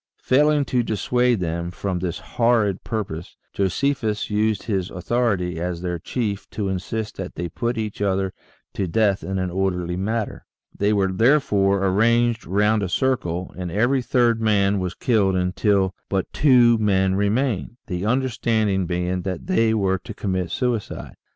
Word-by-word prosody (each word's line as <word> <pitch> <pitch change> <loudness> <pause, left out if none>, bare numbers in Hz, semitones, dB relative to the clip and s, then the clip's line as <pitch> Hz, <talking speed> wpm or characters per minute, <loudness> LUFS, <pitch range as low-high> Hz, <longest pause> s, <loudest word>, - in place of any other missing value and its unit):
Failing 145 +2 +3
to 125 -2 +1
dissuade 120 +1 +1
them 85 0 -2
from 90 +1 -3
this 90 -1 -3
horrid 115 -5 +1
purpose, 95 -8 -5 0.2
Josephus 110 +2 -1
used 105 -1 +1
his 95 -5 -2
authority 95 -3 -1
as 90 0 -3
their 90 -1 -2
chief 105 +1 -3
to 100 -3 -3
insist 105 +3 -4
that 95 -1 -6
they 85 - -3
put 120 +8 -3
each 105 -2 -4
other 95 -1 0 0.4
to 95 - -2
death 100 +2 +1
in 95 0 -3
an 95 -1 -2
orderly 90 -2 -1
manner. 110 +4 -3 0.3
They 100 +1 +1
were 100 -2 +2
therefore 100 -4 +3
arranged 115 +4 +2
round 105 +3 +2
a 95 - -2
circle, 90 -7 -1
and 90 -1 -4
every 120 +7 +2
third 120 -1 +2
man 100 -2 +2
was 90 -1 -3
killed 100 -6 +2
until 95 +1 +1 0.2
but 95 -1 -2
two 120 -5 +5
men 95 -3 +2
remained, 110 +3 0
the 90 +3 -3
understanding 110 -6 +1
being 90 +1 -1
that 90 0 -4
they 115 -12 +2
were 95 -3 +1
to 110 +2 -9
commit 95 -3 -2
suicide. 120 -4 -3
100 Hz, 155 wpm, -22 LUFS, 95-115 Hz, 0.4 s, two